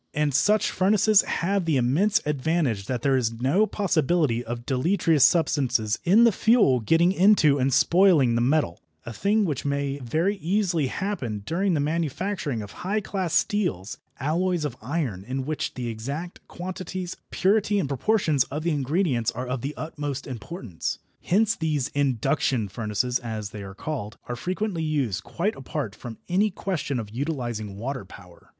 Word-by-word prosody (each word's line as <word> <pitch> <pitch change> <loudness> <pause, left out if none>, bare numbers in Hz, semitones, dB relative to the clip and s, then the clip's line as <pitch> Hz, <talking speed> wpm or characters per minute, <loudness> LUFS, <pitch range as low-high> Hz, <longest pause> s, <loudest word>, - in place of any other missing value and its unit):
And 150 -1 +1
such 210 +10 +3
furnaces 210 +2 +4
have 195 +1 -1
the 160 -4 +2
immense 150 - +2
advantage 145 - 0
that 125 -2 -3
there 135 -1 +3
is 115 -3 0
no 150 - +3
possibility 155 - +1
of 120 0 -6
deleterious 160 +2 +2
substances 130 -10 +2
in 200 +7 +5
the 235 - +6
fuel 210 - +4
getting 165 - +3
into 185 -7 +4
and 130 +1 +2
spoiling 170 -5 +4
the 115 - +1
metal, 130 - +1 0.2
a 115 - -6
thing 205 - +1
which 150 -7 -2
may 140 0 -1
very 160 - 0
easily 175 -4 0
happen 130 - -3
during 180 - 0
the - - +1
manufacture 165 +4 -2
of 100 - -10
high 200 +4 0
class 190 -4 -3
steels, 180 - 0 0.2
alloys 170 +3 0
of 135 -5 -4
iron 125 - -3
in 130 +4 -4
which 155 +1 -3
the 125 -2 -4
exact 140 +10 -5
quantities, 185 0 -6
purity 205 +1 +2
and 190 - 0
proportions 150 - +1
of 150 +3 -5
the 170 - +1
ingredients 145 - 0
are 125 +3 -4
of 125 -1 -3
the 140 +4 -4
utmost 145 -3 -4
importance. 120 - -5 0.2
Hence 220 +4 +2
these 150 -4 -1
"induction 130 -4 0
furnaces," 115 +4 -1
as 110 -4 -5
they 105 - -7
are 95 -1 -9
called, 115 -5 -5
are 120 - -3
frequently 185 - -2
used 140 -11 -1
quite 200 +6 -2
apart 135 -4 -4
from 115 +1 -9
any 195 +4 +2
question 180 -8 -3
of 105 -3 -6
utilising 120 -6 -3
water 125 +2 -4
power. 90 -2 -15
145 Hz, 160 wpm, -25 LUFS, 125-180 Hz, 0.2 s, the